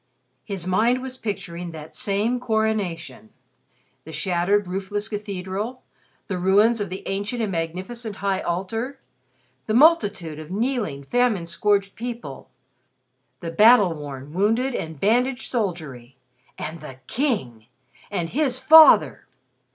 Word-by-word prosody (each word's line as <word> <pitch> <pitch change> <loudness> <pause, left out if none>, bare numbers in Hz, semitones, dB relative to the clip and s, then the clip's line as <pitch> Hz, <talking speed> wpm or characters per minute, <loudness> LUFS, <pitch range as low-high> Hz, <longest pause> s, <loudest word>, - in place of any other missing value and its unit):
His 195 -5 -6
mind 225 +7 +2
was 260 0 -6
picturing 180 -5 -5
that 160 -1 -10
same 230 +1 0
coronation 205 - -2 0.7
the 160 - -10
shattered, 190 +4 +1
roofless 195 +3 -3
cathedral, 205 +3 -5 0.4
the 185 -3 -3
ruins 205 +5 +3
of 200 - -3
the 185 +1 -7
ancient 205 +5 -3
and 215 -3 -1
magnificent 185 +7 -4
high 195 -1 -1
altar, 225 +10 -3 0.7
the 215 - 0
multitude 205 - +3
of 155 0 -9
kneeling, 210 - -2
famine 235 - +1
scourged 195 +4 0
people, 235 - -7 0.9
the 165 - -4
battle 210 0 +6
worn, 145 -2 -8
wounded 225 +8 +1
and 160 -8 -5
bandaged 245 - +1
soldiery! 155 - -4 0.4
And 160 +1 -6
the 135 -4 -9
King! 130 - -2 0.4
And 175 -5 -2
his 270 - 0
father! 315 +3 +7
200 Hz, 120 wpm, -23 LUFS, 170-235 Hz, 0.9 s, father